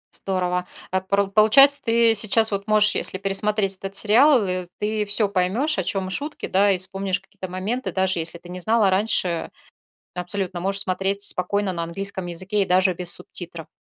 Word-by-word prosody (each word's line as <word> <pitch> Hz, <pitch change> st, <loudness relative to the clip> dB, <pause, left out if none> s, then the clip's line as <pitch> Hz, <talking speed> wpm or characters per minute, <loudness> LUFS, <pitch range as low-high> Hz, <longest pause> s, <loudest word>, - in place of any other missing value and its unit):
Здорово. 180 Hz, -1 st, -2 dB, 0.2 s
А 190 Hz, 0 st, 0 dB
пор 200 Hz, +1 st, 0 dB
получается, 275 Hz, +7 st, +6 dB
ты 230 Hz, -1 st, +3 dB
сейчас 215 Hz, +1 st, +2 dB
вот 200 Hz, +1 st, -3 dB
можешь, 210 Hz, -1 st, +4 dB
если 190 Hz, -, -1 dB
пересмотреть 195 Hz, 0 st, -1 dB
этот 195 Hz, +1 st, -7 dB
сериал, 240 Hz, +3 st, +4 dB
и 180 Hz, -1 st, -3 dB
ты 210 Hz, 0 st, -1 dB
всё 205 Hz, +1 st, +1 dB
поймёшь, 200 Hz, +12 st, 0 dB
о -, -, 0 dB
чём 190 Hz, -1 st, -3 dB
шутки, 295 Hz, +7 st, -4 dB
да, 200 Hz, +1 st, +3 dB
и 185 Hz, -, +1 dB
вспомнишь 190 Hz, +1 st, -2 dB
какие-то 195 Hz, -1 st, -10 dB
моменты, 200 Hz, +8 st, -3 dB
даже 190 Hz, -2 st, 0 dB
если 165 Hz, +1 st, -4 dB
ты 175 Hz, +1 st, -15 dB
не 180 Hz, 0 st, -7 dB
знала 220 Hz, +1 st, +2 dB
раньше, 185 Hz, -4 st, 0 dB, 0.7 s
абсолютно 180 Hz, 0 st, -4 dB
можешь 195 Hz, +2 st, -1 dB
смотреть 195 Hz, +2 st, -2 dB
спокойно 200 Hz, +1 st, +1 dB
на 170 Hz, -1 st, -4 dB
английском 190 Hz, +1 st, -5 dB
языке 185 Hz, +4 st, -2 dB
и -, -, -1 dB
даже 185 Hz, +1 st, +3 dB
без 175 Hz, 0 st, 0 dB
субтитров. 170 Hz, -2 st, -4 dB
195 Hz, 180 wpm, -22 LUFS, 185-210 Hz, 0.7 s, получается